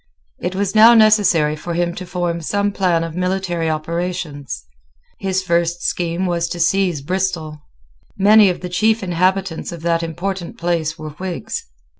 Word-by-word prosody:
It 180 - -3
was 195 0 -1
now 225 +2 +8
necessary 200 -9 +4
for 170 +2 -5
him 175 0 0
to 185 +1 -8
form 175 -1 -2
some 205 +5 0
plan 180 -4 +1
of 165 -1 -5
military 180 -2 -1
operations. 155 - -4 0.5
His 190 -1 -1
first 170 -1 0
scheme 175 +1 -1
was 170 -1 -1
to 175 - -5
seize 175 -3 +1
Bristol. 170 -3 -2 0.6
Many 205 +1 +6
of 180 - -3
the 180 - -5
chief 215 +5 +1
inhabitants 185 0 0
of 170 -2 -9
that 170 -1 +1
important 175 +2 -4
place 165 -2 -1
were 155 -1 -7
Whigs. 180 +3 -5
175 Hz, 155 wpm, -19 LUFS, 165-190 Hz, 0.6 s, now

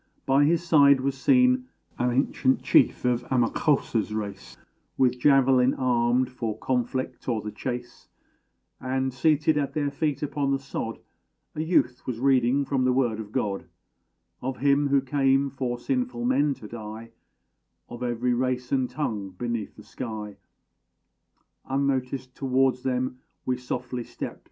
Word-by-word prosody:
By 135 +2 +4
his 165 +2 +2
side 140 -4 +6
was 135 0 -1
seen 255 - +3 0.3
An 125 - +2
ancient 130 +1 +1
chief - - +3
of 125 -1 +2
Amakósa's 120 -3 +1
race, 100 -2 -6 0.4
With 125 -1 +2
javelin 135 -1 +4
armed 125 0 +1
for 115 -4 -4
conflict 130 +2 -2
or 115 -3 +1
the 105 0 -6
chase, 120 0 -6 0.7
And, 130 0 -1
seated 150 +3 +2
at 140 - -3
their 145 -2 0
feet 150 0 -2
upon 145 -1 -1
the 135 - +2
sod, 135 -4 -5 0.6
A 155 - -3
youth 155 -7 +1
was 120 -3 -3
reading 135 +1 +3
from 135 -1 0
the 130 - +3
Word 120 -4 +1
of 105 -2 -7
God, 105 -6 -2 0.8
Of 130 0 -3
Him 140 +1 +3
who 140 -1 +3
came 135 0 +2
for 125 -2 -3
sinful 250 - -2
men 150 - +2
to 110 - -11
die, 110 0 -8 0.8
Of 120 0 -9
every 125 0 0
race 125 0 -1
and 130 -2 +1
tongue 110 -8 -3
beneath 115 +3 -4
the - - -13
sky. 110 -4 -6 1.3
Unnoticed, 130 -1 -1
towards 130 -1 +1
them 130 -1 -2 0.3
we 130 - +1
softly 125 0 -4
stept. - - -7
130 Hz, 145 wpm, -26 LUFS, 120-140 Hz, 1.3 s, side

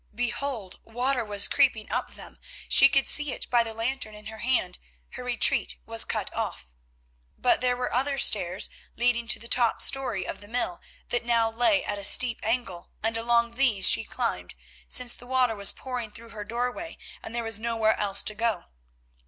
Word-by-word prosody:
Behold! 240 -4 -4
water 245 +2 -2
was 205 -2 0
creeping 250 -6 +1
up - - -3
them, - - -12 0.3
she 275 - +7
could 275 -1 +2
see 295 -2 +5
it - - -7
by 240 -1 +4
the 230 -1 -4
lantern 225 0 -4
in 210 0 -14
her 220 0 -9
hand—her - - -4
retreat - - +2
was - - +5
cut - - -3
off. - - -4 0.7
But - - +1
there 250 -1 0
were 250 - -4
other 275 +2 -1
stairs 190 -7 +2 0.2
leading 235 0 +1
to 235 - +2
the 230 - -11
top 240 -1 +1
storey 260 -8 +2
of - - -7
the 205 - -11
mill 220 -6 -3 0.3
that 240 - -1
now 230 -1 +1
lay 245 +6 +1
at 205 -1 -3
a - - -8
steep 235 +3 +4
angle, 225 -7 -3
and 225 0 0
along 235 +1 +1
these 235 -7 +2
she - - +6
climbed, - - -4 0.3
since 250 -1 +4
the 245 - -10
water 255 -3 +1
was 200 -1 +4
pouring 250 -4 -6
through 230 +2 -12
her 215 -2 -8
doorway 245 +8 -5 0.2
and 225 - -9
there 235 - -2
was 225 -2 0
nowhere 225 -1 0
else 200 -1 +1
to 210 - 0
go. 225 -3 -2
235 Hz, 185 wpm, -26 LUFS, 215-250 Hz, 0.7 s, she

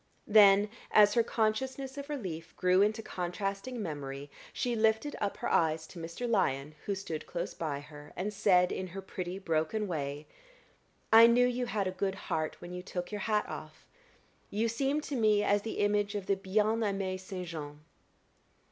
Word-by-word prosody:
Then, 205 -1 +7 0.2
as 205 -1 +6
her 235 - +4
consciousness 260 +5 -1
of 280 +1 -7
relief 175 - -5
grew 185 +1 +3
into 215 +2 +1
contrasting 195 +6 -3
memory, 140 -3 -6 0.2
she 245 -1 -1
lifted 220 +6 +1
up 205 -1 -1
her - - -3
eyes 160 -1 +2
to 170 - -11
Mr. 170 +9 -5
Lyon, 150 - +1
who 200 - 0
stood 165 -5 -5
close 170 - -4
by 145 -4 -3
her, 150 0 -12
and 205 +3 -3
said, 185 -3 +4
in 185 - -3
her 190 +2 -7
pretty 185 -1 -5
broken 165 +3 -1
way: 145 -3 -3 0.9
"I 225 +1 +10
knew 245 +1 +5
you 250 0 -1
had 210 -4 -1
a 185 - -1
good 190 +1 -2
heart 155 -4 -2
when 175 - -8
you 180 - -5
took 180 0 -5
your 210 -1 -4
hat 210 0 +1
off. - - -9 0.6
You 220 +3 0
seemed 275 +6 0
to 290 - -4
me 215 -3 +3
as 205 0 +2
the 220 - -5
image 205 0 +1
of 200 -2 -3
the 195 - +2
bien 210 +3 +1
amié 195 -3 -1
Saint 185 -1 -6
Jean." 150 -3 -7
195 Hz, 180 wpm, -31 LUFS, 175-220 Hz, 0.9 s, I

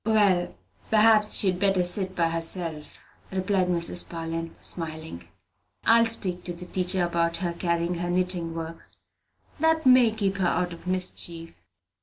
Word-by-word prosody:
"Well, 205 -5 +2 0.3
perhaps 215 -1 +4
she'd 185 -3 +2
better 195 -2 +2
sit 185 +1 0
by 165 -1 +1
herself," 165 -2 -3 0.3
replied 190 0 0
Mrs. 175 0 +1
Parlin, 165 0 -5
smiling. 160 - -4 0.6
"I 230 +1 +6
will 230 - +3
speak 185 -6 0
to 175 - -4
the 175 +1 -9
teacher 180 0 0
about 170 -1 0
her 175 -3 -3
carrying 170 0 -1
her 175 0 -3
knitting 175 -2 -1
work 165 0 -6 0.8
that 320 0 +1
may 255 -2 +6
keep 200 -3 -2
her 185 -2 +1
out 175 0 -1
of 170 - -13
mischief." 175 -2 -1
180 Hz, 150 wpm, -25 LUFS, 170-195 Hz, 0.8 s, I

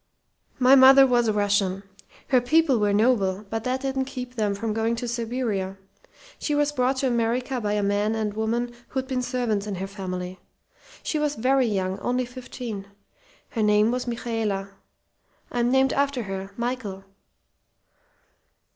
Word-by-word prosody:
"My 255 +1 +5
mother 270 0 +9
was 240 -2 +2
a 215 - +2
Russian. 200 -2 +1 0.5
Her 255 -2 +4
people 280 0 +3
were 205 -1 +2
noble, 205 -2 +2
but 225 0 -2
that 255 +1 -1
didn't 265 -1 -1
keep 250 -2 -7
them 210 -4 0
from 215 +2 -2
going 225 +1 0
to 240 +1 -4
Siberia. 230 -5 -2 0.6
She 295 - -1
was 295 0 +2
brought 260 -1 +1
to 265 - +1
America 245 +2 0
by 205 -1 -1
a 210 -1 0
man 205 +2 +1
and 215 -2 -2
woman 235 +3 -1
who'd 265 -1 -3
been 255 -1 -1
servants 240 -5 -1
in 205 - -3
her 190 +1 -4
family. 185 -2 -6 0.6
She 310 - -1
was 300 -1 0
very 260 +2 +2
young, 190 -3 -1
only 250 +1 0
fifteen. 245 -5 -7 0.6
Her 225 - -3
name 210 +1 +4
was 250 0 -2
Michaela. 225 -5 -2 0.8
I'm 240 0 +1
named 265 +1 +3
after 280 -3 0
her 195 -1 -5
Michael. 235 -5 -3
235 Hz, 155 wpm, -25 LUFS, 205-255 Hz, 0.8 s, mother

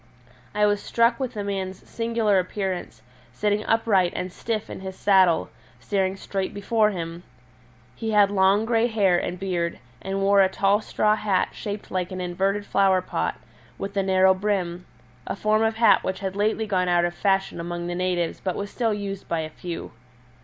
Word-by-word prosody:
I 210 0 +4
was 205 0 +1
struck 235 +1 +2
with 255 -3 -3
the 205 - -3
man's 190 -2 -4
singular 230 -4 +1
appearance, 185 - -4 0.3
sitting 210 - 0
upright 205 -6 +3
and 180 0 -4
stiff 220 -2 -3
in - - -7
his 190 0 -7
saddle, 190 -4 +3 0.3
staring 190 - -1
straight 195 -1 -4
before 210 +1 +2
him. 170 -3 -5 0.7
He 225 - -4
had 205 -2 +4
long 200 +2 +3
grey 230 0 +2
hair 200 -6 +2
and 180 - -4
beard, 175 -3 -2 0.2
and 195 0 -3
wore 200 0 +5
a 190 - +4
tall 200 +2 +2
straw 215 0 +1
hat 205 -3 0
shaped 205 -1 -6
like 180 -1 -2
an 185 - -5
inverted 190 +3 -1
flower 190 -2 +3
pot, - - -2 0.4
with 200 +1 -5
a 200 - +2
narrow 190 0 +4
brim 185 -3 -2 0.4
a - - -2
form 215 +1 +1
of 225 0 +1
hat 225 -2 +5
which 190 0 -3
had 190 -1 -3
lately 215 +2 0
gone 185 -3 0
out 175 0 +3
of 175 - -2
fashion 195 -1 0
among 175 0 -4
the 175 - -3
natives 175 -1 -1
but 185 -2 -1
was 200 0 -5
still 225 -4 0
used 200 -1 -5
by 165 -1 -1
a 155 0 -6
few. 170 +1 -7
195 Hz, 185 wpm, -24 LUFS, 185-210 Hz, 0.7 s, wore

